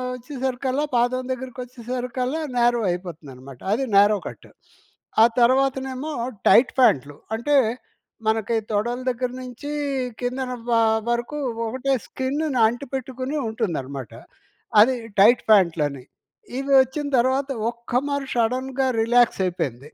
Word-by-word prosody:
ఒచ్చేసరికల్లా 260 +2 -2
పాదం 245 +2 +2
దగ్గరకొచ్చేసరికల్లా 250 +2 -4
న్యారో 240 -1 +3
అయిపోతుందనమాట. 145 -8 -7
అది 255 +5 0
narrow 205 +1 +6
cut. - - -11 0.7
ఆ - - +9 0.2
తర్వాతనేమో 265 +3 +1 0.4
టైట్ 245 +2 +6
ఫ్యాంట్లు. 145 - +3 0.2
అంటే, 285 +6 +2 0.7
మనకి 220 +1 +1
తొడల 235 +4 -1
దగ్గర 250 0 -2
నుంచీ 255 +3 -7 0.5
కిందన 250 +1 -2 0.2
వా 230 -1 +4 0.3
వరకు 240 +5 -2 0.3
ఒకటే 260 +4 -1
స్కిన్నుని 270 +1 -2
అంటిపెట్టుకుని 260 +3 -4
ఉంటుందనమాట. 140 - -4 0.7
అది 255 +4 +5 0.2
టైట్ 225 +5 +6
ఫ్యాంట్లని. 160 -9 +3 0.6
ఇవి 275 +1 -3
ఒచ్చిన 285 +3 -5
తర్వాత 260 +3 +1 0.2
ఒక్క 235 +1 -3
మారి 280 -1 -2
షడన్‌గా 255 +3 0 0.2
రిలాక్సయిపోయింది. 185 - +1
245 Hz, 100 wpm, -23 LUFS, 220-260 Hz, 0.7 s, ఆ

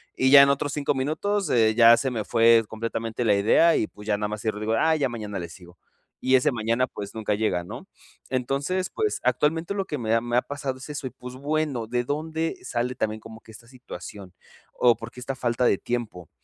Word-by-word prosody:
y 130 +1 +2
ya 140 -1 +10
en - - +5
otros 140 +1 0
5 145 -1 -1
minutos, 160 +7 -1
eh, 110 -2 +3
ya 115 0 +7
se 130 +3 -1
me 110 -3 -3
fue 115 -1 +5
completamente 115 +1 -4
la 105 -2 +4
idea, 115 +12 +4
y 110 - 0
pues, 105 +1 -14
ya 105 -1 +1
nada 105 0 -2
más 105 0 -5
cierro 110 -2 -2
y - - -9
digo: 110 +1 -1
"Ah, 160 0 +3
ya 140 -4 0
mañana 105 -4 -6
le 85 - -6
sigo" 90 -1 -15 0.5
y 130 0 +5
ese 130 - +3
mañana 115 +3 0
pues, 100 -1 -8
nunca 105 -2 -1
llega, 90 -5 -1
¿no? - - -9 0.4
Entonces 140 +9 -1
pues, 430 -1 -2
actualmente 165 +5 0
lo 195 -1 -1
que 150 - -4
me 115 -3 -1
ha 115 - +2
me 120 0 -1
ha - - +4
pasado 140 -2 -5
es 130 - -10
eso, 145 -2 -5
y - - -5
pues 125 0 -10
bueno, 145 -4 -2
¿de 120 +1 -1
dónde 160 +3 -2
sale 125 +1 -2
también 110 0 -2
como 110 0 -12
que 110 - -16
esta 115 +2 -14
situación? 105 -7 -10 0.4
O, 120 -2 +4
¿por 115 0 -9
qué 125 - -12
esta 135 +2 -5
falta 120 -1 0
de 100 - +3
tiempo? 110 -9 -5
120 Hz, 235 wpm, -25 LUFS, 110-140 Hz, 0.5 s, ya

